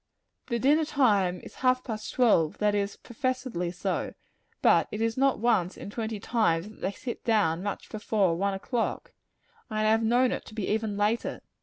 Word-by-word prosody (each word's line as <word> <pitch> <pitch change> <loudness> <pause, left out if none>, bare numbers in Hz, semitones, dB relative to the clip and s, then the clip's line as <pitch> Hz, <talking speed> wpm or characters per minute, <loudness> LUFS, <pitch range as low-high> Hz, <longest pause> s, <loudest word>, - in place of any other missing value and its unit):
The 235 - 0
dinner 290 +6 +3
time 205 -12 +2
is - - -11
half 255 0 +3
past 215 -3 -5
twelve 205 -11 +3
that 210 -1 +2
is, 200 0 -1
professedly 250 -7 -3
so; 180 - -3 0.5
but - - +5
it 210 - -4
is 225 0 0
not 270 0 +2
once 210 -5 +1
in 200 - -8
twenty 220 -1 -4
times 200 -5 +1
that 215 - -16
they 195 - -1
sit 240 +3 -7
down 190 -8 +2
much 200 0 -4
before 210 -5 +1
one 195 +2 0
o'clock 230 +4 -3 0.6
and 215 - -4
I 215 0 +3
have 225 +1 +3
known 245 +3 +3
it - - -3
to 215 - -12
be 215 -4 -2
even 215 -1 -1
later. 210 +3 0
220 Hz, 185 wpm, -28 LUFS, 200-240 Hz, 0.6 s, but